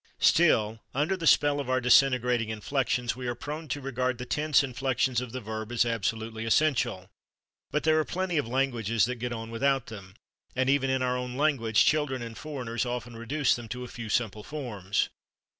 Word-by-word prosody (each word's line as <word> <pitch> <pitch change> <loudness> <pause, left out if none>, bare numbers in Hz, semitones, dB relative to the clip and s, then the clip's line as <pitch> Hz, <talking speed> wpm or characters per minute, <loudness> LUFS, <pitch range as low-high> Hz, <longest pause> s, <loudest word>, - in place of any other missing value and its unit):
Still 115 -10 +3 0.2
under 150 +7 +1
the 165 -3 -2
spell 145 -1 +4
of 140 -3 -4
our 130 0 +2
disintegrating 125 -2 +4
inflections, 120 +2 -1
we 125 -1 -5
are 120 - -2
prone 150 +5 -6
to 145 - -3
regard 130 -2 -2
the 125 - -6
tense 150 +2 +2
inflections 130 -1 0
of 125 -2 -6
the 130 - -4
verb 110 +1 -5
as 120 0 +2
absolutely 115 0 -2
essential, 115 -7 +1 0.6
but 150 - -1
there 155 0 +4
are - - +2
plenty 180 -1 -1
of 130 - -2
languages 115 -4 +1
that 125 +1 -3
get 125 0 -2
on 115 -1 -5
without 135 +2 +1
them, 100 -4 -10 0.4
and 130 +1 +2
even 135 -1 +2
in 130 -1 +1
our 125 0 +1
own 125 0 -4
language 130 -7 +3
children 145 -5 +1
and 115 -1 -7
foreigners 125 -6 -3
often 120 -1 -4
reduce 130 +4 +1
them 120 -1 -8
to 125 +2 -5
a - - -6
few 115 -3 -7
simple 110 -2 0
forms. 105 -8 -2
125 Hz, 190 wpm, -28 LUFS, 115-140 Hz, 0.6 s, spell